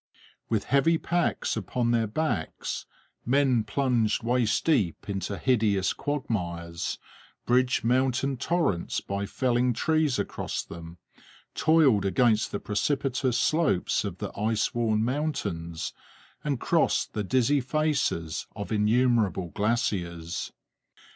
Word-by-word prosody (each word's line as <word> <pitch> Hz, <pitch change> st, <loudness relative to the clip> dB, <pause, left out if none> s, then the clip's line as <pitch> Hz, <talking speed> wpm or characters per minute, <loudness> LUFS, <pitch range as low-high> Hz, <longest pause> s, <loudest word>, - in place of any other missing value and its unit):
With 110 Hz, -3 st, +1 dB
heavy 150 Hz, +5 st, +3 dB
packs 175 Hz, +1 st, 0 dB
upon 120 Hz, -2 st, -1 dB
their 115 Hz, -2 st, +2 dB
backs 110 Hz, -, -3 dB, 0.4 s
men 130 Hz, -2 st, +2 dB
plunged 115 Hz, -1 st, +1 dB
waist 120 Hz, -2 st, +1 dB
deep 120 Hz, -, +1 dB
into 100 Hz, 0 st, -3 dB
hideous 105 Hz, -7 st, +2 dB
quagmires, 85 Hz, -, -3 dB, 0.5 s
bridged 125 Hz, +1 st, +2 dB
mountain 130 Hz, +3 st, +1 dB
torrents 160 Hz, -, 0 dB
by 100 Hz, 0 st, -4 dB
felling 125 Hz, +1 st, +1 dB
trees 155 Hz, +2 st, +1 dB
across 100 Hz, -, -3 dB
them, 85 Hz, 0 st, -10 dB, 0.6 s
toiled 150 Hz, -11 st, +4 dB
against 110 Hz, +2 st, +2 dB
the 100 Hz, -, -2 dB
precipitous 130 Hz, +2 st, 0 dB
slopes 155 Hz, -, +1 dB
of 100 Hz, -4 st, -5 dB
the -, -, -6 dB
ice 110 Hz, +1 st, 0 dB
worn 110 Hz, -2 st, +1 dB
mountains, 100 Hz, -, -3 dB, 0.5 s
and 140 Hz, -4 st, -1 dB
crossed 165 Hz, +4 st, +1 dB
the 105 Hz, -, -2 dB
dizzy 130 Hz, +6 st, +2 dB
faces 135 Hz, -, -1 dB
of 100 Hz, +2 st, -6 dB
innumerable 110 Hz, -4 st, +2 dB
glaciers. 90 Hz, -6 st, -2 dB
120 Hz, 110 wpm, -27 LUFS, 100-135 Hz, 0.6 s, toiled